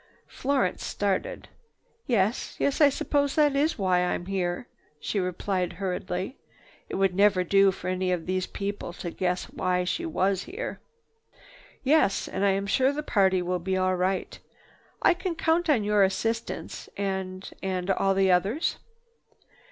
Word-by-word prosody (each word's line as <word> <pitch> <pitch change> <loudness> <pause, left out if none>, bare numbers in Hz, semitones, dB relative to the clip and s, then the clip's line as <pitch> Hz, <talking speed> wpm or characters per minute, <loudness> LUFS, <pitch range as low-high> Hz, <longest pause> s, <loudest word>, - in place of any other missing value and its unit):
Florence 260 -9 -1
started. 205 - -2 0.6
"Yes, 220 -2 +1
yes, 280 +2 0
I 290 - +8
suppose 285 0 0
that 295 -2 +4
is 300 +4 +1
why 185 -3 +2
I'm 180 0 -1
here," 185 +2 -2 0.3
she 200 - -2
replied 180 0 -1
hurriedly. 185 +3 -3 0.5
It - - -4
would 195 -1 +2
never 195 -1 +4
do 195 +2 +4
for 185 -1 -8
any 185 0 0
of 175 -3 -1
these 185 0 -1
people 200 -3 -4
to 175 -1 -6
guess 180 0 -1
why 180 0 0
she 330 - -2
was 195 - 0
here. 380 - -5 1.0
"Yes. 275 -8 +3
And 190 - -3
I 200 - +5
am 195 +1 0
sure 260 +7 +3
the 300 +1 -4
party 190 -7 +2
will 180 0 -1
be 190 +2 -1
all 185 0 +2
right. 185 +1 -1 0.6
I - - +6
can 350 0 -3
count 330 +1 +1
on 250 -8 +4
your 210 0 +3
assistance 225 +4 -1
and—and 190 -1 -3
all 195 0 +2
the 190 -1 +4
others?" 200 - +1
195 Hz, 150 wpm, -27 LUFS, 185-235 Hz, 1.0 s, I